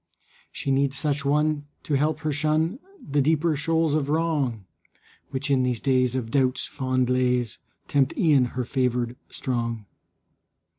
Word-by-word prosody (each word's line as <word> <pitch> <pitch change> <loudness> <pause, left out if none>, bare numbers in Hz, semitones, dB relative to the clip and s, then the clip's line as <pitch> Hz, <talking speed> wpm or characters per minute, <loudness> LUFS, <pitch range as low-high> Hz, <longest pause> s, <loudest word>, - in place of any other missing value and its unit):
She 140 - -2
needs 135 0 +1
such 145 -1 0
one 150 +1 +1 0.2
to 150 - -3
help 150 +3 +1
her 155 -1 -1
shun 155 - +1 0.3
The 145 0 +2
deeper 155 +2 +2
shoals 160 +1 +1
of 145 -2 0
wrong, 145 - 0 0.6
Which 140 +1 -2
in 135 -2 +3
these 125 -2 0
days 130 -1 +2
of 115 -3 -3
doubt's 130 -1 +1
fond 130 -1 -1
lays 125 -3 +1 0.3
Tempt 135 -2 +1
e'en 145 -6 +4
her 130 - 0
favored 125 -2 0
strong. 115 -4 -3
140 Hz, 145 wpm, -25 LUFS, 125-150 Hz, 0.6 s, e'en